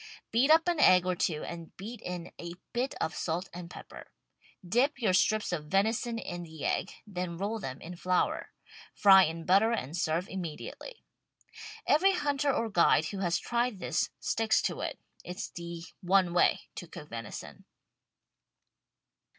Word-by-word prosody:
Beat 250 Hz, +5 st, +3 dB
up 325 Hz, +2 st, +6 dB
an 345 Hz, -3 st, +1 dB
egg 180 Hz, -9 st, +6 dB
or 185 Hz, -1 st, +1 dB
two 160 Hz, -3 st, -1 dB
and 170 Hz, -1 st, -8 dB
beat 225 Hz, +5 st, -8 dB
in 180 Hz, -1 st, -6 dB
a 170 Hz, 0 st, -6 dB, 0.2 s
bit 250 Hz, +3 st, -1 dB
of 160 Hz, -, -1 dB
salt 175 Hz, +3 st, -3 dB
and 175 Hz, 0 st, -7 dB
pepper. -, -, -11 dB, 0.6 s
Dip 265 Hz, +9 st, +2 dB
your 215 Hz, -7 st, +2 dB
strips 215 Hz, +3 st, +2 dB
of 155 Hz, -4 st, -3 dB
venison 220 Hz, +6 st, +1 dB
in 175 Hz, -6 st, -5 dB
the 160 Hz, -3 st, -7 dB
egg, -, -, 0 dB
then 180 Hz, -4 st, -4 dB
roll 205 Hz, +4 st, -2 dB
them 130 Hz, -8 st, -6 dB
in 175 Hz, +2 st, -8 dB
flour. 180 Hz, +1 st, 0 dB, 0.5 s
Fry 190 Hz, -2 st, +8 dB
in 165 Hz, +1 st, -5 dB
butter 200 Hz, +5 st, +4 dB
and 160 Hz, -, -2 dB
serve 170 Hz, +1 st, 0 dB
immediately. 190 Hz, -, -7 dB, 0.8 s
Every 380 Hz, +7 st, +4 dB
hunter 290 Hz, -4 st, +1 dB
or 230 Hz, -3 st, 0 dB
guide 170 Hz, -5 st, +4 dB
who 200 Hz, -, -5 dB
has 175 Hz, -2 st, +1 dB
tried 240 Hz, -2 st, -1 dB
this 180 Hz, -, -1 dB
sticks 225 Hz, -1 st, +2 dB
to -, -, -1 dB
it. -, -, -3 dB, 0.3 s
It's 180 Hz, 0 st, -5 dB
the 170 Hz, -1 st, -7 dB, 0.2 s
one 185 Hz, -1 st, +3 dB
way 175 Hz, -, +4 dB, 0.2 s
to 175 Hz, -, -6 dB
cook 160 Hz, -3 st, -10 dB
venison. 115 Hz, -2 st, -8 dB
185 Hz, 160 wpm, -30 LUFS, 170-230 Hz, 0.8 s, Fry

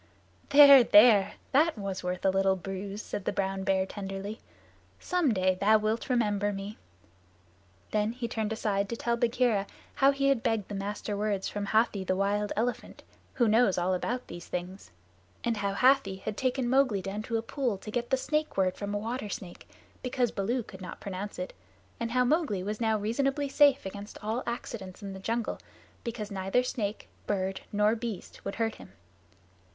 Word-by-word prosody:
"There 280 Hz, -2 st, +9 dB
there! 210 Hz, -3 st, +6 dB, 0.2 s
That 305 Hz, +1 st, +3 dB
was 195 Hz, -2 st, -4 dB
worth 180 Hz, +1 st, -3 dB
a 190 Hz, -, +5 dB
little 195 Hz, 0 st, +2 dB
bruise," 195 Hz, +2 st, -6 dB
said 200 Hz, -, -5 dB
the -, -, +1 dB
brown 195 Hz, -1 st, -2 dB
bear 190 Hz, -1 st, +2 dB
tenderly. 195 Hz, +2 st, -6 dB, 0.6 s
"Some 355 Hz, -7 st, +1 dB
day 185 Hz, -2 st, +2 dB
thou 205 Hz, +4 st, +4 dB
wilt 215 Hz, +4 st, -2 dB
remember 205 Hz, -4 st, +1 dB
me." 200 Hz, +1 st, -6 dB, 1.1 s
Then 210 Hz, +1 st, +1 dB
he 240 Hz, -1 st, -4 dB
turned 220 Hz, -2 st, -2 dB
aside 200 Hz, -2 st, -1 dB
to 235 Hz, -, -2 dB
tell 235 Hz, +1 st, 0 dB
Bagheera 235 Hz, -4 st, +1 dB, 0.3 s
how 275 Hz, -, +4 dB
he 275 Hz, 0 st, +2 dB
had 270 Hz, -4 st, +2 dB
begged 220 Hz, -4 st, -1 dB
the -, -, -5 dB
Master 205 Hz, +1 st, -3 dB
Words 205 Hz, -2 st, -1 dB
from 205 Hz, -1 st, -4 dB
Hathi 215 Hz, -2 st, +2 dB
the 185 Hz, 0 st, 0 dB
Wild 205 Hz, +2 st, 0 dB
Elephant, 240 Hz, +3 st, -3 dB, 0.3 s
who 240 Hz, -3 st, +3 dB
knows 220 Hz, -2 st, +4 dB
all 180 Hz, +1 st, +1 dB
about 245 Hz, +7 st, -2 dB
these 175 Hz, 0 st, -9 dB
things, 180 Hz, -, -6 dB, 0.5 s
and 235 Hz, -2 st, 0 dB
how 200 Hz, -1 st, -1 dB
Hathi 260 Hz, -4 st, +4 dB
had 215 Hz, -, -2 dB
taken 255 Hz, +1 st, 0 dB
Mowgli 255 Hz, -6 st, +2 dB
down 200 Hz, +2 st, -4 dB
to 225 Hz, +1 st, -2 dB
a 225 Hz, -, -3 dB
pool 245 Hz, -4 st, -2 dB
to 215 Hz, +3 st, -9 dB
get 240 Hz, +1 st, -2 dB
the 265 Hz, -, +3 dB
Snake 305 Hz, +1 st, -1 dB
Word 185 Hz, -1 st, +2 dB
from 205 Hz, 0 st, -3 dB
a -, -, +1 dB
water 225 Hz, +1 st, -4 dB
snake, 185 Hz, -2 st, -8 dB, 0.3 s
because 250 Hz, -2 st, 0 dB
Baloo 230 Hz, +5 st, -1 dB
could 190 Hz, -2 st, -12 dB
not 180 Hz, -, -8 dB
pronounce 200 Hz, +1 st, -6 dB
it, 180 Hz, -, -5 dB, 0.5 s
and 230 Hz, -, -2 dB
how 250 Hz, +1 st, +2 dB
Mowgli 280 Hz, -, +1 dB
was 210 Hz, +3 st, -4 dB
now 220 Hz, -1 st, +2 dB
reasonably 270 Hz, +7 st, 0 dB
safe 280 Hz, -2 st, +4 dB
against 200 Hz, +2 st, -7 dB
all 220 Hz, +4 st, -1 dB
accidents 215 Hz, -5 st, -6 dB
in 195 Hz, -1 st, -5 dB
the 190 Hz, -, -8 dB
jungle, 230 Hz, +4 st, -2 dB, 0.4 s
because 225 Hz, -3 st, -5 dB
neither 195 Hz, +5 st, +1 dB
snake, 215 Hz, -4 st, -3 dB, 0.2 s
bird, 190 Hz, -1 st, -1 dB
nor 210 Hz, +2 st, +3 dB
beast 225 Hz, -4 st, -6 dB
would 195 Hz, -, -4 dB
hurt 225 Hz, -1 st, 0 dB
him. 95 Hz, -, -14 dB
210 Hz, 185 wpm, -29 LUFS, 195-240 Hz, 1.1 s, There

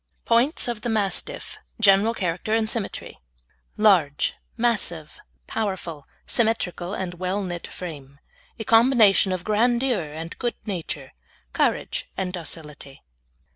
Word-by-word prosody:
POINTS 240 Hz, +7 st, +4 dB
OF 235 Hz, -3 st, -3 dB
THE 240 Hz, -, -3 dB
MASTIFF: 210 Hz, -3 st, 0 dB, 0.2 s
GENERAL 210 Hz, +2 st, +5 dB
CHARACTER 185 Hz, +3 st, -1 dB
AND 225 Hz, -1 st, +1 dB
SYMMETRY 220 Hz, -2 st, -3 dB, 0.6 s
Large, 180 Hz, -10 st, +3 dB, 0.2 s
massive, 205 Hz, -10 st, 0 dB, 0.3 s
powerful, 190 Hz, -8 st, -4 dB, 0.2 s
symmetrical 205 Hz, -5 st, -1 dB
and 185 Hz, -2 st, -4 dB
well 185 Hz, +3 st, -2 dB
knit 175 Hz, -2 st, -5 dB
frame. 145 Hz, -6 st, -9 dB, 0.4 s
A 220 Hz, -, -4 dB
combination 225 Hz, -4 st, +5 dB
of 185 Hz, -2 st, -2 dB
grandeur 235 Hz, +2 st, +2 dB
and 160 Hz, +2 st, -7 dB
good 240 Hz, -1 st, -1 dB
nature, 165 Hz, -, -5 dB, 0.4 s
courage -, -, 0 dB
and 185 Hz, -2 st, -2 dB
docility. 150 Hz, -5 st, -7 dB
195 Hz, 115 wpm, -24 LUFS, 170-225 Hz, 0.6 s, GENERAL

